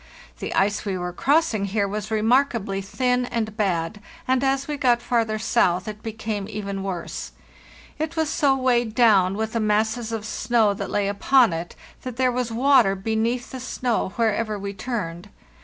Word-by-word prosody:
The - - -4
ice 200 +1 +1
we 195 -3 -2
were 180 0 -4
crossing 265 - +2
here 200 +1 0
was 210 +1 -4
remarkably 220 -3 +1
thin 250 +5 0
and 220 -3 -3
bad, 195 -2 -1 0.3
and 260 0 +2
as 270 0 +1
we 300 - -2
got 250 -4 +3
farther 230 -3 0
south 190 -5 +1
it 210 0 -6
became 220 -2 -4
even 200 -2 -4
worse. 190 -3 -5 0.7
It 315 +2 -3
was 320 -1 +1
so 285 -3 +2
weighed 240 -4 +1
down 200 -6 +4
with 220 0 -2
the 230 - 0
masses 220 +2 0
of 220 -2 -4
snow 220 -1 +1
that 200 -1 -5
lay 205 -1 0
upon 230 +2 +3
it 165 +1 -5 0.3
that 255 -2 -6
there 255 0 +2
was 245 -1 -2
water 240 -4 +4
beneath 225 +5 -1
the 260 - -6
snow 250 -4 -1
wherever 220 -1 0
we 200 0 -5
turned. 195 -5 -5
220 Hz, 175 wpm, -23 LUFS, 200-250 Hz, 0.7 s, down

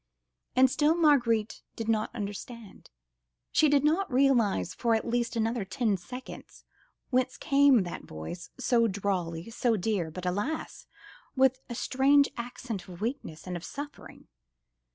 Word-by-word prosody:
And 260 +1 +6
still 300 +5 +2
Marguerite 240 -10 +2
did 225 - -5
not 220 -1 +1
understand. 210 +1 -7 0.6
She 310 - +4
did 285 -1 +3
not 325 +5 +1
realise 245 - +2
for 230 -1 +1
at 220 - -2
least 235 0 -1
another 225 0 0
ten 220 +1 0
seconds 250 +8 -10 0.5
whence 255 0 +1
came 275 -6 +4
that 175 - -7
voice, 80 - -8
so 240 -3 +3
drawly, 185 -2 -2
so 230 -1 +1
dear, 190 -4 -1
but 180 +3 -7
alas! 205 - -3 0.5
with 265 -1 +3
a 240 - -4
strange 280 +4 +3
accent 235 -4 -6
of 175 -2 -10
weakness 220 - -4
and 180 -1 -4
of 175 - -6
suffering. 285 +6 -9
230 Hz, 140 wpm, -29 LUFS, 200-265 Hz, 0.6 s, And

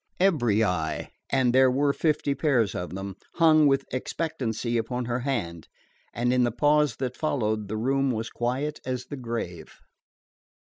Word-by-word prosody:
Every 120 - +3
eye, 80 -6 -2 0.2
and 130 -3 +2
there 130 0 +6
were 140 +2 +2
fifty 150 -2 +1
pairs 130 -7 +1
of 90 0 -5
them, 95 0 -6 0.2
hung 155 -3 +5
with 135 -1 +2
expectancy 125 -4 -2
upon 120 +2 -1
her 120 +1 -1
hand, 105 - -3 0.4
and 120 +1 0
in 125 -1 +3
the 120 - +1
pause 150 +4 +2
that 130 -2 -3
followed 110 -9 -1
the 110 +2 -3
room 135 +4 +1
was 115 -2 -2
quiet 130 +5 -2
as 125 -1 -3
the 145 - -7
grave. 115 -9 -6
125 Hz, 155 wpm, -26 LUFS, 110-140 Hz, 0.4 s, there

